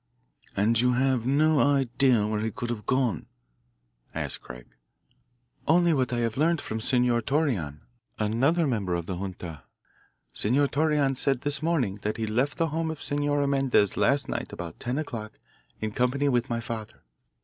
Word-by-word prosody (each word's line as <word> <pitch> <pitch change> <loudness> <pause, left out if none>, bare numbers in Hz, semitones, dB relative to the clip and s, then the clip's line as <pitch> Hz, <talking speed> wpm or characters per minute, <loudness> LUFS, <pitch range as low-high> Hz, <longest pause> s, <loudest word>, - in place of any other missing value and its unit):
"And 110 +3 +3
you 125 0 +3
have 130 -1 +1
no 150 +2 +3
idea 130 -4 +3
where 105 0 -1
he 110 +1 -1
could 120 +3 -4
have 105 -4 -6
gone?" 125 - 0 0.9
asked - - -3
Craig. 60 -1 -10 1.0
"Only 170 +1 +4
what 130 -4 0
I 120 -1 0
have 115 0 -1
learned 165 +3 +2
from 110 -4 -4
Senor 120 0 +2
Torreon, 115 - -1 0.4
another 130 +11 +2
member 105 -10 0
of 85 -1 -3
the 90 0 -4
junta. 90 -5 -6 0.7
Senor 135 +6 +2
Torreon 145 -3 +1
said 135 -1 0
this 145 0 -1
morning 135 - 0
that 105 - -2
he 110 - -1
left 125 +7 0
the 165 -1 +1
home 160 +2 -1
of 160 -2 -5
Senora 145 0 +1
Mendez 135 -7 +2
last 140 0 +2
night - - -4
about 85 -1 -7
ten 125 +3 -2
o'clock 115 -8 -5 0.5
in 110 0 -3
company 125 +5 +1
with 120 -2 +1
my 120 -1 -1
father. 110 -1 -7
125 Hz, 165 wpm, -27 LUFS, 110-145 Hz, 1.0 s, Only